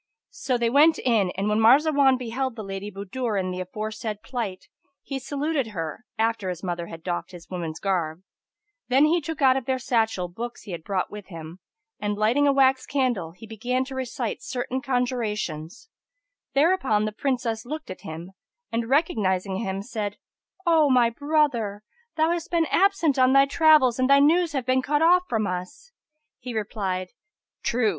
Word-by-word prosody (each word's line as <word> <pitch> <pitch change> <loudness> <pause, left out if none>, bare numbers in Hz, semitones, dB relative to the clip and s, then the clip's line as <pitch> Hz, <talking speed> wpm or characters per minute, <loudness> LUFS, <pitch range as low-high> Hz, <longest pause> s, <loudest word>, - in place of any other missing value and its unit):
So 265 - -1
they 235 -1 0
went 305 +4 +5
in 220 -7 +2
and 195 +2 -1
when 210 +1 +2
Marzawan 270 +3 +5
beheld 255 +1 -3
the 220 - -6
Lady 195 +1 -5
Budur 205 +3 -3
in 185 -1 -2
the 180 - -4
aforesaid 215 +2 -5
plight, 225 -8 -5 0.4
he 275 -1 -4
saluted 285 0 -2
her, 165 +1 -5
after 225 -3 0
his 180 0 -5
mother 175 -2 -3
had 165 -1 -10
doffed 175 -1 -3
his 175 0 -12
woman's 165 -3 -4
garb: 175 -3 -1 0.6
then 265 +4 +5
he 335 +3 +2
took 310 -1 -4
out 260 -1 +6
of 265 - -4
their 260 0 0
satchel 225 -7 0
books 235 +7 -7
he 205 - -9
had 170 -2 -6
brought 190 0 -2
with 205 -2 -9
him; 165 0 -9 0.4
and, 205 0 -1
lighting 235 +7 +3
a - - +5
wax 265 -1 +3
candle, 245 - -1
he 180 +5 -12
began 245 +4 -2
to 270 - -8
recite 255 -3 -3
certain 255 +1 -3
conjurations 235 - -2 0.7
Thereupon 275 - +3
the 215 - -2
Princess 230 -1 -2
looked 305 -1 -6
at 185 - -9
him 165 +3 -8 0.4
and 230 0 -2
recognising 200 - +1
him, 195 -2 -3
said, 210 -3 -4 0.5
"O 320 -4 +4
my 245 -3 +4
brother, 245 -7 0 0.3
thou 320 +1 +2
hast 345 +2 -3
been 335 -2 +2
absent 340 -8 +3
on 255 0 +5
thy 275 0 +7
travels' 280 -4 +4
and 255 +1 +2
thy 280 - +7
news 325 +3 +3
have 265 -4 -2
been 255 0 +2
cut 295 +3 +1
off 360 +2 +5
from 220 -3 0
us." 185 - -5 0.5
He 250 -2 -7
replied, 195 -4 -2 0.5
"True! 235 -2 +1
235 Hz, 175 wpm, -25 LUFS, 195-275 Hz, 0.7 s, thy